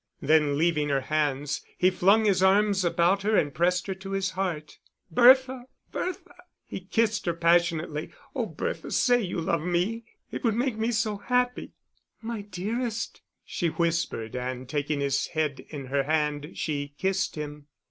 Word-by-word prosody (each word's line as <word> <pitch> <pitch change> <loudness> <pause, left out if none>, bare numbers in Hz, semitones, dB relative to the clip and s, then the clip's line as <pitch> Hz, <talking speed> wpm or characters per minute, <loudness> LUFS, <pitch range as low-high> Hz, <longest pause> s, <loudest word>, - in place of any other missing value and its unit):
Then 150 -2 +3
leaving 155 -2 +1
her 135 -1 +1
hands, 145 0 -1 0.2
he 185 +1 +4
flung 200 +4 +4
his 195 -3 +3
arms 195 0 +4
about 175 +3 +2
her 215 +2 +2
and 145 -2 +1
pressed 180 +2 +1
her 195 - -2
to 195 +1 -8
his 195 -1 0
heart. 175 -6 -4 0.3
"Bertha, 260 0 +5 0.3
Bertha!" 370 0 -4 0.3
He - - -6
kissed 210 +2 0
her 170 - +1
passionately. 170 -2 +1 0.3
"Oh, - - -1
Bertha, - - -4
say 245 -1 +3
you 180 -4 -3
love 165 -1 0
me. 180 +7 -1 0.3
It - - -5
would 225 -3 +2
make 245 0 0
me 220 +1 -1
so 215 -2 0
happy." 250 +4 -1 0.5
"My 225 -1 -5
dearest," 220 +4 -4 0.2
she 175 - -2
whispered, 165 -9 -1
and 125 0 -4
taking 145 +1 -1
his 140 -1 0
head 155 -4 -1
in 145 -3 -6
her 140 +2 0
hand, 150 +1 -1
she 145 -2 -3
kissed 190 +2 0
him. 150 -1 -7
175 Hz, 160 wpm, -27 LUFS, 150-210 Hz, 0.5 s, Bertha